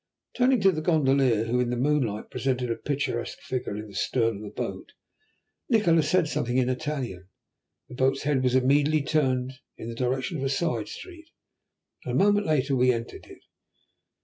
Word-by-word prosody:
Turning 255 0 +3
to 195 -1 +5
the 155 -3 -3
gondolier, 135 -8 +2
who 120 +2 0
in 125 -1 +1
the 120 - -2
moonlight 125 -6 0
presented 125 -1 -1
a - - 0
picturesque 140 -4 -3
figure 125 -5 -4
in 105 0 -7
the 100 - -14
stern 115 +3 0
of - - -10
the 105 - -7
boat, - - -6 0.8
Nikola 180 -9 +4
said 170 +2 +2
something 125 -4 -1
in 130 -1 +2
Italian. 130 - -4 0.6
The - - -12
boat's 130 +2 +1
head 140 -2 +1
was 130 0 +1
immediately 145 +3 +3
turned 130 -3 0 0.2
in 115 - -7
the - - -5
direction 130 +7 -1
of - - -3
a 135 - 0
side 135 -7 -1
street, 340 -4 -11 0.7
and - - -4
a - - +5
moment 205 -1 +2
later 140 -3 +1
we 125 0 +4
entered 115 -1 -6
it. - - -15
130 Hz, 180 wpm, -26 LUFS, 125-155 Hz, 0.8 s, to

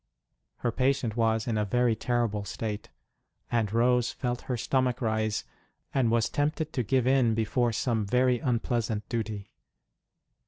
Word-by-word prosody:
Her 120 - -1
patient 130 -3 +1
was 115 -1 +1
in 110 -3 0
a - - +2
very 120 +2 +2
terrible 115 -3 0
state, 105 +1 -5 0.6
and 115 -4 +1
Rose 120 +1 +3
felt 125 -1 -3
her 125 - 0
stomach 130 0 +1
rise, 110 -2 0 0.5
and 130 -4 +2
was 115 -1 +2
tempted 150 +2 -1
to 130 - 0
give 125 +2 +1
in, 130 -4 +3
before 115 +2 +1
some 110 -1 0
very 125 +2 +3
unpleasant 115 -3 -1
duty. 110 -4 -3
115 Hz, 145 wpm, -28 LUFS, 110-125 Hz, 0.6 s, Rose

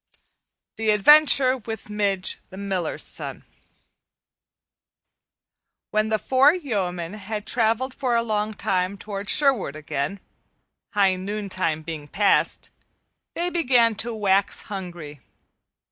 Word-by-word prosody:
The 220 -1 -1
Adventure 265 +4 +6
with 225 -1 -7
Midge 200 -3 -1
the 190 - -11
Miller's 190 -4 -2
Son - - -6 2.5
WHEN 215 0 +1
THE 220 - +2
four 270 - +4
yeomen 190 - -3
had 210 0 -6
traveled 235 +3 +1
for 255 -3 -1
a 230 - +2
long 215 -1 -2
time 185 +1 -1
toward 200 0 -5
Sherwood 265 - +2
again, 150 +4 -4 0.8
high 195 -2 +3
noontide 185 -5 -3
being 155 -3 -6
past, 200 +6 +1 0.6
they 350 +1 -1
began 250 -9 +3
to 235 +2 -1
wax 200 -3 +1
hungry. 175 -7 -7
210 Hz, 110 wpm, -24 LUFS, 185-235 Hz, 2.5 s, Adventure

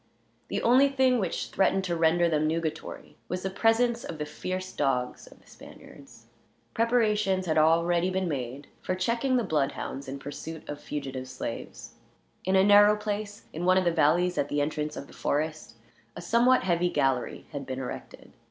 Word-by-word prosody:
The - - -3
only 260 +4 +5
thing 260 -2 +3
which 185 -5 -2
threatened 195 0 +1
to 175 -2 -1
render 170 +1 +3
them 155 -2 +1
nugatory 160 0 -4
was 180 +1 -3
the 190 - -2
presence 230 +3 +2
of 165 - -6
the 150 - -3
fierce 185 +4 -5
dogs 125 -3 -1
of - - -17
the - - -26
Spaniards. - - -15 0.5
Preparations 215 -5 +1
had 160 -2 +2
already 170 +3 +3
been 185 0 -1
made 135 -2 -4 0.2
for 185 - -2
checking 235 +7 0
the 240 - +1
bloodhounds 140 -4 -2
in 135 +1 -5
pursuit 150 +3 -8
of 145 0 -6
fugitive 135 -3 -5
slaves. 130 -3 -7 0.5
In 190 +1 +2
a 190 - +6
narrow 205 +1 +7
place, 210 0 -4
in 165 - -4
one 185 +1 +4
of 185 - +2
the 175 - +3
valleys 175 +3 +2
at 140 - 0
the 145 - 0
entrance 150 +1 -2
of 140 - -6
the - - -17
forest, 155 -3 -2 0.4
a - - -7
somewhat 235 +8 +3
heavy 175 -1 +1
gallery 135 -5 -1
had 140 -3 -6
been 130 -1 -4
erected. 130 -1 -8
175 Hz, 180 wpm, -27 LUFS, 150-205 Hz, 0.5 s, narrow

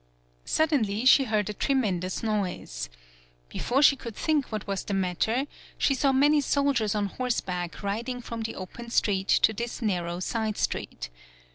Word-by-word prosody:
Suddenly 250 -9 +1
she 270 +1 +7
heard 215 -3 0
a 210 - -3
tremen 220 -6 +1
dous 185 +4 -4
noise. 180 - -2 0.6
Before 255 - +1
she 285 - +7
could 235 -5 -8
think 305 -5 0
what 215 -2 -3
was 195 -1 -2
the 200 - -2
matter, 195 +7 0 0.3
she 275 - +2
saw 275 0 +2
many 290 +3 +4
sol 280 0 +2
diers 220 -5 0
on 205 -1 +1
horseback 190 -6 -3
riding 235 +5 -2
from 230 -1 -6
the 225 - -4
open 235 +6 -8
street 195 -4 +1
to 220 - +4
this 235 +3 -4
narrow 175 -6 -1
side 215 +2 -2
street. - - -3
220 Hz, 165 wpm, -27 LUFS, 195-255 Hz, 0.6 s, she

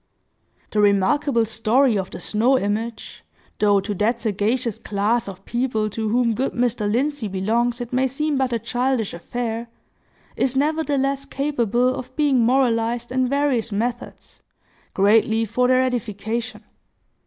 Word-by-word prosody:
The 210 - +2
remarkable 230 +5 +2
story 225 +3 +2
of 190 -2 -2
the - - -8
snow 240 +5 +2
image, 220 +1 -4 0.4
though 205 -1 +4
to 205 +2 -3
that 220 +5 0
sagacious 220 +2 -1
class 215 +3 0
of 195 0 -9
people 235 -3 -1
to 220 +1 -2
whom 235 0 +2
good 255 +5 -2
Mr. 235 -4 0
Lindsey 275 0 0
belongs 230 +6 0
it 245 +1 -6
may 260 +1 +2
seem 300 +3 -1
but 265 -2 0
a 235 - +1
childish 245 -1 -1
affair, 230 +6 -4 0.7
is, 260 0 0
nevertheless, 280 -2 0
capable 255 -4 0
of 255 0 -8
being 290 -4 +2
moralized 235 -1 +1
in 255 0 +1
various 270 -4 0
methods, 240 +4 -4 0.5
greatly 220 +3 +3
for 250 +4 +1
their 255 0 +4
edification. 235 -1 -3
235 Hz, 140 wpm, -22 LUFS, 215-260 Hz, 0.7 s, though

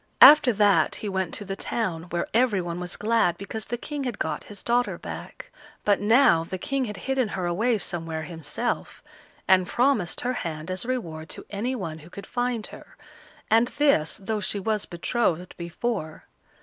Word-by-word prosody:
After 295 -4 +10
that 205 -1 +4
he 215 - -5
went 190 -3 -1
to 205 - -5
the 195 0 -4
town, 180 -7 -2
where 175 -1 -2
every 230 -3 +3
one 175 -1 -4
was 180 -1 -4
glad 215 -6 +2
because 215 +3 -5
the 240 - -2
King 290 +3 -5
had 245 -5 -3
got 155 -1 -3
his 205 -2 -9
daughter 245 +1 +1
back; - - -8 0.3
but 205 -1 +3
now 210 -6 +5
the 185 +3 -5
King 275 +6 -1
had 210 -3 -6
hidden 265 -3 +1
her 185 -3 -3
away 220 +7 +1
somewhere 165 -4 -4
himself, 165 +8 -3 0.4
and 185 -1 +5
promised 240 -8 +1
her 250 +1 0
hand 160 0 -5
as 185 +4 -3
a - - -8
reward 165 -12 -3
to - - -7
any 230 +6 -2
one 165 -8 -5
who 160 +2 -14
could 200 +2 -9
find 245 -1 -1
her, - - -12 0.5
and 225 +2 +5
this 280 - +3
though 210 +2 -2
she 205 +1 -2
was 215 +1 -1
betrothed 180 -1 -1
before. 170 -1 -4
200 Hz, 185 wpm, -26 LUFS, 175-240 Hz, 0.5 s, After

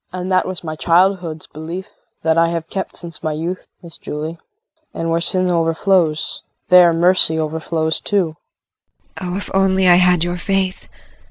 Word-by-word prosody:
And 185 +1 -5
that 185 0 +2
was 185 -1 -4
my 155 -1 -5
childhood's 170 -1 +1
belief 170 +6 -8 0.3
that 160 0 +2
I 165 0 +4
have 165 -1 -4
kept 190 -2 -4
since 170 -2 -9
my 155 - -2
youth, 170 +4 -5 0.2
Miss 170 -2 -11
Julie. 155 +3 -6 0.6
And 165 0 -2
where 165 0 +1
sin 185 +1 +2
overflows, 165 -1 +1 0.3
there 180 -1 +7
mercy 170 -1 +3
overflows 160 0 -1
also. - - -3
JULIE. 185 -6 0 0.9
Oh, 180 0 -3
if 205 - -7
I - - +2
only 190 0 +2
had 180 -1 +5
your 175 0 -2
faith. 190 0 -2
175 Hz, 165 wpm, -18 LUFS, 160-185 Hz, 0.9 s, there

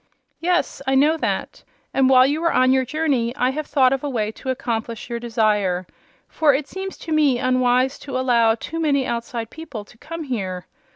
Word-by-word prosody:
"Yes; 350 -4 0
I 270 - +2
know 295 +4 +4
that. - - -3 0.3
And 265 -1 +3
while 255 -1 +7
you 295 +4 0
were 335 - +2
on 255 0 +4
your 260 -1 +2
journey 265 -4 0
I 255 -2 +1
have 305 +2 -4
thought 265 -3 +3
of 270 - -2
a 290 - -2
way 215 -5 -1
to 260 - -8
accomplish 230 -2 -3
your 235 - -2
desire. 210 -6 0 0.4
For 295 -4 +3
it 280 +1 -3
seems 385 0 -6
to 325 - -8
me 295 -5 +3
unwise 255 +1 +2
to 270 -3 -5
allow 235 -3 +3
too 325 +8 -6
many 280 -4 +1
outside 235 -1 -4
people 270 -10 -8
to 235 - -20
come 330 +1 -6
here. 190 -9 -4
255 Hz, 195 wpm, -22 LUFS, 235-290 Hz, 0.4 s, while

